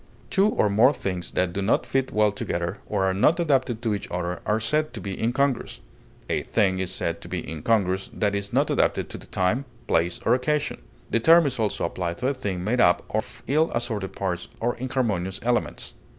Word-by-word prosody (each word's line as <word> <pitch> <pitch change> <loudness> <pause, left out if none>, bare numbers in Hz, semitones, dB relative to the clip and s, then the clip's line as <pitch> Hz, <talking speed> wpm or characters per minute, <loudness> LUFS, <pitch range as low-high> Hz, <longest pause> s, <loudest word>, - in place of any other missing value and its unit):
Two 195 +2 +4
or 110 - +2
more 110 +7 +5
things 90 -8 -3
that 90 -1 0
do 100 - -2
not 100 - +2
fit 135 -1 0
well 105 -1 +3
together, 85 -4 -3
or 100 -2 0
are 95 - +2
not 150 - +3
adapted 130 -7 +1
to 110 -3 +1
each 100 - -4
other, 90 0 -3
are 105 +1 +2
said 150 +7 0
to - - -6
be 95 0 -5
incongruous; 130 +3 0 0.5
a - - 0
thing 95 -4 +1
is 95 -1 -1
said 85 0 -2
to - - -9
be - - -4
incongruous 95 +3 0
that 105 -1 0
is 100 0 -3
not - - +2
adapted - - +1
to - - -7
the - - -14
time, 100 +9 0 0.2
place, 85 +1 +1
or 115 - +4
occasion; 145 +4 0 0.3
the 115 - +3
term 165 +6 +6
is 130 -3 -2
also 105 -5 0
applied 85 0 -3
to 125 - -4
a 140 - +2
thing 100 -9 -3
made 120 +5 +1
up 90 -4 +4
of - - -3
ill 155 +5 +2
assorted 110 -5 -2
parts 90 -3 -2
or 120 +1 0
inharmonious 115 -8 -1
elements. 120 0 -1
105 Hz, 210 wpm, -25 LUFS, 95-125 Hz, 0.5 s, term